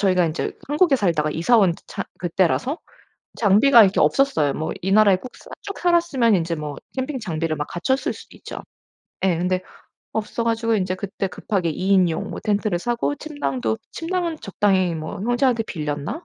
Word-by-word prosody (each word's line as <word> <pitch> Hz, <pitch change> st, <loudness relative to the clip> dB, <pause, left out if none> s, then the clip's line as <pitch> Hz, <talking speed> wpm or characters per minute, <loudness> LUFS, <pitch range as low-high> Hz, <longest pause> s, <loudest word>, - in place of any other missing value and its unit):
저희가 185 Hz, -3 st, +3 dB
인제 160 Hz, 0 st, -3 dB
한국에 295 Hz, 0 st, +3 dB
살다가 165 Hz, -9 st, +1 dB
이사 170 Hz, +11 st, +3 dB
온 190 Hz, -5 st, +4 dB
차 -, -, -4 dB, 0.2 s
그때라서 185 Hz, -, 0 dB, 0.6 s
장비가 225 Hz, +4 st, +6 dB
이렇게 195 Hz, -2 st, +3 dB
없었어요. 270 Hz, -, +3 dB
뭐 160 Hz, -, -3 dB
이 190 Hz, +2 st, 0 dB
나라에 205 Hz, -2 st, +6 dB
꾹 245 Hz, +7 st, -10 dB, 0.3 s
쭉 400 Hz, -1 st, -6 dB
살았으면 335 Hz, -, +3 dB
인제 170 Hz, 0 st, -1 dB
뭐 150 Hz, -2 st, -5 dB, 0.2 s
캠핑 260 Hz, +1 st, -2 dB
장비를 165 Hz, -5 st, -2 dB
막 150 Hz, -, -3 dB
갖췄을 260 Hz, +10 st, -1 dB
수도 -, -, -14 dB
있죠. -, -, -8 dB, 0.6 s
예 180 Hz, -3 st, +3 dB
근데 185 Hz, +1 st, 0 dB, 0.5 s
없어 220 Hz, +1 st, -2 dB
가지고 230 Hz, 0 st, +1 dB
인제 185 Hz, -2 st, 0 dB
그때 195 Hz, 0 st, -4 dB
급하게 185 Hz, -2 st, -2 dB
2 185 Hz, +5 st, -3 dB
인용 185 Hz, 0 st, +2 dB
뭐 -, -, -6 dB
텐트를 205 Hz, -3 st, 0 dB
사고 240 Hz, +8 st, -1 dB
침낭도 135 Hz, -, -2 dB, 0.2 s
침낭은 335 Hz, -1 st, -2 dB
적당히 190 Hz, -3 st, +1 dB
뭐 155 Hz, -1 st, -5 dB
형제한테 240 Hz, +1 st, +1 dB
빌렸나? 150 Hz, -, -4 dB
195 Hz, 355 characters per minute, -22 LUFS, 170-245 Hz, 0.6 s, 장비가